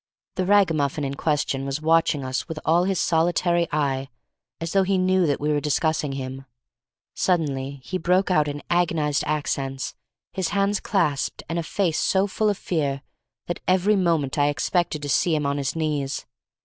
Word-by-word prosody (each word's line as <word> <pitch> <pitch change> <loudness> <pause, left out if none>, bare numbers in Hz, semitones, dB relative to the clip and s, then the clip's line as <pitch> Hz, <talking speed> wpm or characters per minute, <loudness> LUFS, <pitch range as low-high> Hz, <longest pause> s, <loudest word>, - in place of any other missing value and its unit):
The 185 -1 -2
ragamuffin 160 -8 +2
in 135 0 -2
question 145 -2 -1
was 135 +1 -3
watching 160 -3 +2
us 130 +1 -3
with 160 - -6
all 170 +3 +3
his 190 -2 0
solitary 170 +1 +2
eye, 135 -3 -1 0.5
as 165 0 -4
though 195 - +4
he 190 0 +1
knew 185 -1 +3
that 145 - 0
we 150 - -1
were 145 - +2
discussing 150 0 0
him. 135 0 -6 0.7
Suddenly 140 -6 -1
he 185 +5 -3
broke 180 +3 +2
out 155 -4 +3
in 145 0 -5
agonized 160 -4 +1
accents, 135 -3 -2 0.4
his 190 -3 -1
hands 200 +1 +1
clasped, 150 -9 -1
and 165 +1 -2
a - - 0
face 170 0 0
so 190 0 +2
full 210 +2 0
of 205 - 0
fear 140 -7 -2 0.4
that 175 - -4
every 185 +3 +3
moment 165 -7 +1
I 145 - +4
expected 155 0 -1
to - - -3
see 160 +4 +2
him 150 -1 -1
on 140 0 0
his 140 +2 -2
knees. 150 -3 -2
160 Hz, 175 wpm, -24 LUFS, 140-180 Hz, 0.7 s, though